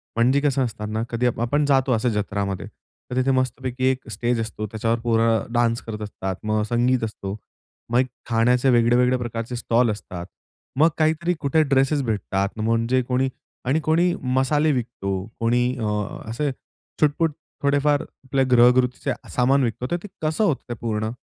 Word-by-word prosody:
म्हणजे 125 +5 +3
कसं 140 -2 +2
असत 115 -3 -7
ना 110 +1 -1
कधी 120 +1 -1
आप 120 - -2
आपण 145 +5 +1
जातो 135 -2 +2
असं 115 +2 +1
जत्रामध्ये. 100 -3 -2 0.5
तर - - -2
तिथे 130 +1 +2
मस्तपैकी 130 0 -1
एक 130 -1 -6
स्टेज 120 +1 0
असतो 110 -1 -4
त्याच्यावर 115 +2 -1
पोरं 115 -1 +1
डान्स 120 -1 +2
करत 110 -1 -6
असतात, 95 -2 -4
मग 110 0 +1
संगीत 120 +1 +2
असतो. 100 -3 -4 0.6
मग 120 - +4
एक 130 - +2 0.2
खाण्याचे 120 +3 +3
वेगळे-वेगळे 125 +1 +4
प्रकारचे 120 0 -4
स्टॉल 120 -1 +2
असतात. 90 -4 -7 0.5
मग 160 +2 +6
काहीतरी 160 +2 +1
कुठे 150 +2 +2
ड्रेसस 135 +1 +2
भेटतात 100 -2 -2
म्हणजे 115 +3 +1
कोणी 130 +1 0 0.4
आणि 135 +5 +2
कोणी 170 +3 +3 0.2
मसाले 150 +4 +3
विकतो, 100 -7 -3
कोणी, 120 +2 +2
अ, 110 - -2 0.4
असे 140 +5 -1 0.5
छुटपूट 155 +2 +3 0.3
थोडेफार 145 +1 +3
आपल्या 135 0 -2
ग्रहगृतीचे 125 +1 +4 0.2
सामान 135 +2 +3
विकतात. 120 +1 -2
तर 175 - +1
ते - - -6 0.2
कसं 155 +7 +1
होतं 160 -10 +1
ते - - -2
पूर्ण? 110 -1 -1
125 Hz, 160 wpm, -23 LUFS, 115-135 Hz, 0.6 s, मग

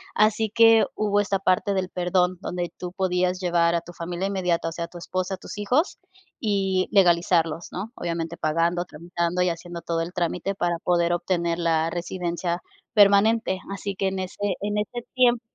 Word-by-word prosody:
así 215 +1 +3
que 225 -1 +6
hubo 205 -1 +1
esta 195 -1 0
parte 195 +1 +1
del 185 -1 -1
perdón, 180 0 +1
donde 175 -2 -3
tú 180 -1 -6
podías 185 -1 0
llevar, 170 -2 +2
a 170 - 0
tu 175 +1 -12
familia 175 +3 -3
inmediata, 180 -4 0
o - - -8
sea, 170 +1 -4
a - - -12
tu 175 - -12
esposa, 185 +2 -3
tus - - -9
hijos, 255 - +1 0.4
y 195 -4 +1
legalizarlos, 170 -4 +3
¿no? 200 +5 -5
Obviamente, 170 -1 -3
pagando, 170 +3 +1
tramitando, 170 +2 -2
y 180 - +2
haciendo 170 0 -6
todo 165 0 -1
el 165 +2 -4
trámite 180 +2 -1
para 175 -2 0
poder 170 0 +2
obtener 170 -1 0
la 165 -1 +1
residencia 175 0 -3 0.3
permanente. 205 -1 +4
Así 200 0 -4
que, 190 0 0
en 190 0 -4
ese 185 0 -5 0.3
en 205 +1 -1
ese 230 +3 -3
tiemp 245 -2 +4
180 Hz, 180 wpm, -25 LUFS, 170-200 Hz, 0.4 s, que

